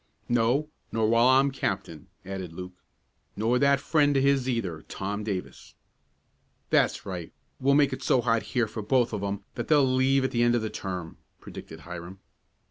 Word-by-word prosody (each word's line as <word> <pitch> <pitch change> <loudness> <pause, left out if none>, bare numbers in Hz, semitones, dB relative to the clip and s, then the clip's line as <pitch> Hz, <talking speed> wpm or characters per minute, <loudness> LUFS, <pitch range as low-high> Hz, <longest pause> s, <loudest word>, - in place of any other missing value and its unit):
"No, 120 +5 +2 0.2
nor 110 -1 +1
while 115 +2 +4
I'm 135 +2 +5
captain," 135 - -4 0.2
added 95 -3 -6
Luke. 90 +1 -8 0.6
"Nor 115 +3 +1
that 140 0 +4
friend 145 -1 +2
of 135 - +2
his 135 -2 +2
either, 95 -10 -2
Tom 100 +2 -4
Davis." 100 -4 -6 1.0
"That's - - +2
right; 90 -4 -6 0.3
we'll 140 +1 +3
make 145 -1 +4
it - - -5
so 130 - +3
hot 115 -2 +2 0.2
here 120 -2 +3
for 110 - -6
both 120 +3 +1
of - - -2
'em 100 0 -3
that 120 - -5
they'll 145 -3 +5
leave 130 +1 +2
at 130 - 0
the 120 - 0
end 120 0 +4
of 115 - 0
the 110 - -3
term," 90 -4 -5 0.2
predicted - - -10
Hiram. 85 +2 -8
115 Hz, 180 wpm, -27 LUFS, 95-135 Hz, 1.0 s, I'm